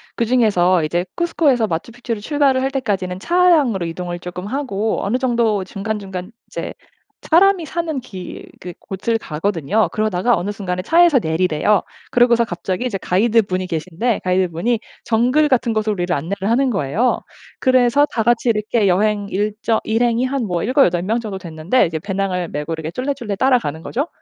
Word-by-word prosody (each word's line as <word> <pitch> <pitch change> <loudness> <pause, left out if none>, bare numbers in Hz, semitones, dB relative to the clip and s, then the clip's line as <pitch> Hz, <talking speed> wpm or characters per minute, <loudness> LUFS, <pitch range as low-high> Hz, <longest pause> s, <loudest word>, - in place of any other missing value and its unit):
그중에서 205 -8 +2
이제 175 +4 -1
쿠스코에서 295 -9 +2
마추픽추를 225 +5 -4
출발을 280 0 +2
할 265 - 0
때까지는 195 -9 -2
차량으로 310 - +3
이동을 175 +1 -5
쪼끔 180 +1 -7
하고 225 -4 -2
어느 220 +5 +1
정도 235 -6 +1
중간중간 195 -1 -5 0.2
이제 - - -5 0.6
사람이 360 0 +4
사는 320 -2 -3
길 190 -7 -9 0.2
그 180 0 -8
곳을 205 +4 -2
가거든요. 190 +2 -1
그러다가 215 +1 +1
어느 185 +4 -2
순간에 185 -3 -3
차에서 335 - +5
내리래요. 175 +2 +1 0.3
그러고서 240 -1 +4
갑자기 185 +3 -3
이제 225 -6 -1
가이드분이 190 -1 +1
계신데 180 +7 -2
가이드분이 185 +5 +1 0.3
정글 250 +7 +3
같은 240 -3 +2
곳으로 215 -1 0
우리를 180 -2 -1
안내를 195 +8 -3
하는 260 +3 +2
거예요. 200 - 0 0.4
그래서 255 +2 +4
다 225 - 0
같이 240 +1 +2
이렇게 215 -1 +1
여행 205 +2 +1
일정 215 +3 -1
일행이 235 +2 +1
한 265 -1 -1 0.2
7-8 225 - +3
명 220 +5 0
정도 205 -4 -5
됐는데 170 +7 0
이제 160 - -4
배낭을 190 -2 -2
메고 150 +3 -4
이렇게 160 -1 -4
쫄래쫄래 250 -3 -3
따라가는 235 - +1
거죠. 280 - -2
215 Hz, 390 characters per minute, -19 LUFS, 185-245 Hz, 0.6 s, 차에서